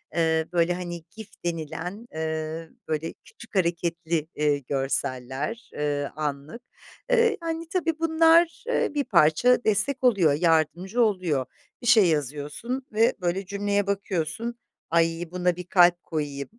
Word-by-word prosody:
eee, 160 -1 +2
böyle, 170 0 +2
hani, 175 -2 -6
GIF 220 -2 -9 0.2
denilen, 175 +6 -4
eee, 160 0 -4 0.2
böyle 160 +1 -2
küçük 235 -2 -16
hareketli, 170 -3 0
eee, 150 -1 +2
görseller, 135 - -3
eee, 145 -1 -2
anlık. 150 - -4 0.5
Eee, 465 -3 +3
yani, 330 0 -4
tabii 330 -3 -1
bunlar, 330 +5 +4
eee, - - +1
bir 290 -1 0
parça 210 +5 +4
destek 245 +6 +1
oluyor, 195 - +4
yardımcı 170 +7 +1
oluyor. 185 - +1 0.4
Bir 240 - -5
şey 225 -4 +7
yazıyorsun 150 - -2
ve, 225 +2 +3
böyle, 180 +2 -1
cümleye 200 +1 -1
bakıyorsun, 200 +3 -2 0.3
"Ay, 165 +1 +1
buna 180 -1 0
bir 180 - -6
kalp 175 -1 +4
koyayım, 145 -3 -4
175 Hz, 130 wpm, -25 LUFS, 155-230 Hz, 0.5 s, şey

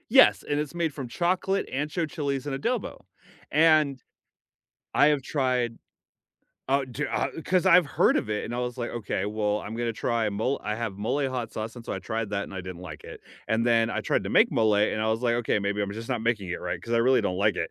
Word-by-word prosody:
Yes, 265 +3 +6
and 145 0 0
it's 150 +2 -4
made 165 -3 0
from 135 -3 -6
chocolate, 185 +7 0
ancho 150 +4 -1
chilies, 140 -4 -2
and 135 -1 -2
adobo, 235 - -2 0.5
and 155 -4 +4 0.9
I 145 - +5
have 150 -2 +2
tried 125 -4 0 0.9
oh, 135 +1 +2
ju 130 +4 -3
uh, - - -1 0.2
'cause 185 0 +2
I've 180 -2 +7
heard 145 - +3
of 110 - -1
it, 105 - -1
and 120 - -5
I - - -3
was 125 0 -3
like, 120 - -3
"Okay, 105 -4 -3
well, 105 0 0
I'm 110 +2 -6
gonna 120 0 -1
try, 115 0 0
mo" 110 +7 -1
I 105 - -1
have 115 -2 -3
mole 135 +7 0
hot 125 -3 -4
sauce, 110 +2 -5
and 120 - -9
so - - -4
I - - -3
tried 110 +3 -3
that 100 0 -1
and - - -10
I 95 - -4
didn't 90 -1 -8
like 80 -4 -9
it, - - -10 0.3
and 115 +2 +1
then 115 -1 +3
I - - -1
tried - - 0
to - - -3
make - - +5
mole, 110 -2 +3
and 105 +1 +1
I 110 - +1
was 110 +1 0
like, 120 -1 +2
"Okay, 120 -3 +1
maybe 100 0 -1
I'm 100 0 -3
just 115 +2 -7
not 125 -4 -1
making 110 -5 0
it 85 - -3
right, 90 - -3
'cause 115 +3 -2
I - - +4
really 130 +2 +4
don't 90 -4 -1
like 105 +2 +2
it." - - -2
120 Hz, 245 wpm, -27 LUFS, 105-140 Hz, 0.9 s, I've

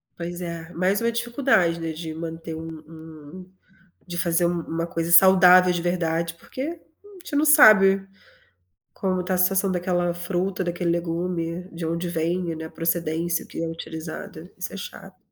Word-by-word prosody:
Pois 175 +1 -6
é, 170 -1 -6
mais 185 +4 +1
uma 235 0 +1
dificuldade, 235 -7 +1
né, 165 -1 -3
de 160 0 -6
manter 165 0 -6
um 160 +1 -7 0.2
um, 160 +2 -12 0.6
de 175 - -6
fazer 170 0 +2
um 175 0 -1
uma 165 +1 -3
coisa 165 0 -3
saudável 185 0 +7
de 175 - -2
verdade, 170 -1 -1
porque 170 - -11
a 325 +5 -9
gente 295 - -5
não 295 - +3
sabe, 210 -10 +6 0.9
como 185 -2 -1
está 180 +1 -2
a - - 0
situação 190 +1 +2
daquela 175 -1 0
fruta, 180 +2 -2
daquele 175 0 -1
legume, 170 0 -3
de 165 0 -6
onde 170 +2 -2
vem, 170 +1 -2
né, 160 0 -7
a - - -8
procedência 165 0 -1
que - - -6
é - - -2
utilizada 165 +1 -8
isso 180 - -5
é - - -6
chato. 195 -1 -10
175 Hz, 170 wpm, -24 LUFS, 165-185 Hz, 0.9 s, saudável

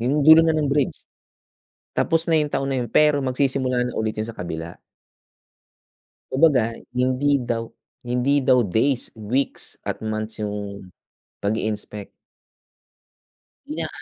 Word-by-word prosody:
Yung 140 +5 +1
dulo 160 +2 +9
na 165 -1 +2
ng 150 -2 +1
bridge. 145 -2 +1 1.0
Tapos 165 +1 +1
na 165 - +3
yung 150 -1 -1
taon 135 - -1
na 130 - 0
yun, 120 -2 -3
pero 150 -1 +4
magsisimula 130 -1 0
na 125 - -6
ulit 110 -1 -1
yun 110 - -2
sa 115 - -8
kabila. 85 -2 -6 1.5
Kumbaga 125 -8 +4 0.2
hindi 130 +3 +2
daw 115 -1 -2 0.4
hindi 125 +4 +2
daw 125 -2 +4
days, 115 +7 0
weeks 115 +6 -3
at - - -4
months 110 0 -4
yung 100 -2 -5 0.5
pag-i-inspect. 105 -1 -3 1.6
Na - - -2
125 Hz, 130 wpm, -23 LUFS, 110-140 Hz, 1.6 s, dulo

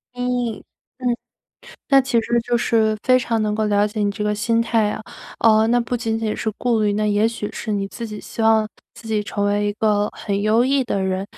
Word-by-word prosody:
嗯， 245 -2 -1 0.4
嗯， 255 - -3 0.8
那 275 -1 +6
其 255 -3 +1
实 235 +1 0
就 240 +1 0
是 225 -2 +2
非 255 0 +5
常 230 -2 -1
能 210 -1 0
够 215 0 0
了 205 0 +2
解 210 +1 -5
你 205 - +1
这 210 +1 -4
个 210 0 +1
心 230 +2 +1
态 225 -2 +1
啊。 215 - -5 0.4
呃， 220 -1 +4
那 240 +1 +3
不 240 +1 -2
仅 225 -1 -2
仅 220 -1 -2
是 220 - -2
顾 235 -3 +1
虑， 210 -1 +2
那 215 +1 0
也 210 +1 +2
许 230 -2 -5
是 220 - -5
你 200 -1 -1
自 230 +4 -7
己 210 -1 -7
希 230 - -6
望， 220 -1 +4 0.3
自 230 - -13
己 215 -1 0
成 205 0 -3
为 205 0 +1
一 205 - 0
个 210 -1 +1
很 200 -1 -3
优 220 +3 +3
异 270 +1 +2
的 215 -5 -2
人， 190 0 -1
220 Hz, 250 characters per minute, -21 LUFS, 210-235 Hz, 0.8 s, 那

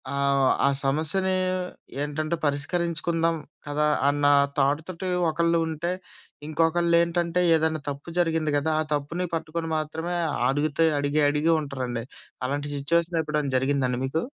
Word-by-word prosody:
ఆహ్, 140 -1 +2 0.2
ఆ - - +5 0.2
సమస్యని 160 +7 +1 0.7
ఏంటంటే 155 +3 -2
పరిష్కరించుకుందాం 165 +3 0 0.3
కదా! 150 +1 0 0.2
అన్న 145 0 0 0.3
థాట్ 140 +2 +2
తోటి 185 +1 -5 0.2
ఒకళ్ళు 170 +2 +2
ఉంటే, 160 +2 -2 0.6
ఇంకొకళ్ళేంటంటే 170 +2 +2
ఏదైనా 160 -1 0
తప్పు 145 +4 -7
జరిగింది 165 -3 +1
కదా! 150 +2 0
ఆ - - 0
తప్పుని 155 +5 -2
పట్టుకొని 165 0 -4
మాత్రమే 160 +3 -3 0.3
అడుగుతే 145 +3 +1
అడిగి, 145 +2 +1
అడిగి 150 +3 +2
ఉంటారండి. 130 -5 -4 0.4
అలాంటి 145 +2 -2
సిట్యుయేషన్ 170 +4 +1
ఎప్పుడైనా 150 -2 -1
జరిగిందా 135 0 +1
అండి 125 -1 -1
మీకు? 155 +5 -1
155 Hz, 125 wpm, -25 LUFS, 145-170 Hz, 0.7 s, ఆ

